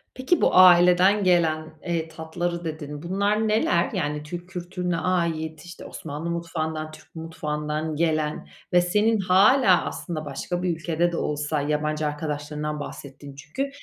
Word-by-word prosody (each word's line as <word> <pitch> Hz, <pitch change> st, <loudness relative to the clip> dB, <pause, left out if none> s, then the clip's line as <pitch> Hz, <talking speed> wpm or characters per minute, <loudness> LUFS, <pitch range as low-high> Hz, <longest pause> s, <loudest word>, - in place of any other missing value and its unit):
Peki 265 Hz, +7 st, +1 dB
bu, -, -, +5 dB
aileden 180 Hz, +2 st, +6 dB
gelen, 160 Hz, -3 st, +2 dB
eee, 165 Hz, -2 st, -1 dB
tatları, 170 Hz, +2 st, -4 dB
dedin. 150 Hz, -1 st, -6 dB
Bunlar 200 Hz, +4 st, 0 dB
neler? 210 Hz, -5 st, +2 dB
Yani, 150 Hz, +1 st, -2 dB
Türk 175 Hz, +4 st, -8 dB
kültürüne 180 Hz, -1 st, -3 dB
ait, 165 Hz, -3 st, -1 dB
işte, 175 Hz, -, -11 dB
Osmanlı 155 Hz, +2 st, -6 dB
mutfağından, 160 Hz, -2 st, -3 dB
Türk 155 Hz, +2 st, -16 dB
mutfağından 155 Hz, -1 st, -3 dB
gelen 155 Hz, -1 st, -1 dB, 0.3 s
ve 175 Hz, -, +6 dB
senin 210 Hz, +5 st, +2 dB
hâlâ 195 Hz, +2 st, +5 dB
aslında 155 Hz, -3 st, -5 dB
başka 175 Hz, +6 st, -4 dB
bir 175 Hz, -2 st, 0 dB
ülkede 170 Hz, +1 st, 0 dB
de 170 Hz, -, -3 dB
olsa, 150 Hz, 0 st, -1 dB
yabancı 150 Hz, +1 st, -1 dB
arkadaşlarından 150 Hz, 0 st, -4 dB
bahsettin 140 Hz, -1 st, -9 dB
çünkü, 155 Hz, -, -4 dB
165 Hz, 140 wpm, -24 LUFS, 150-180 Hz, 0.3 s, aileden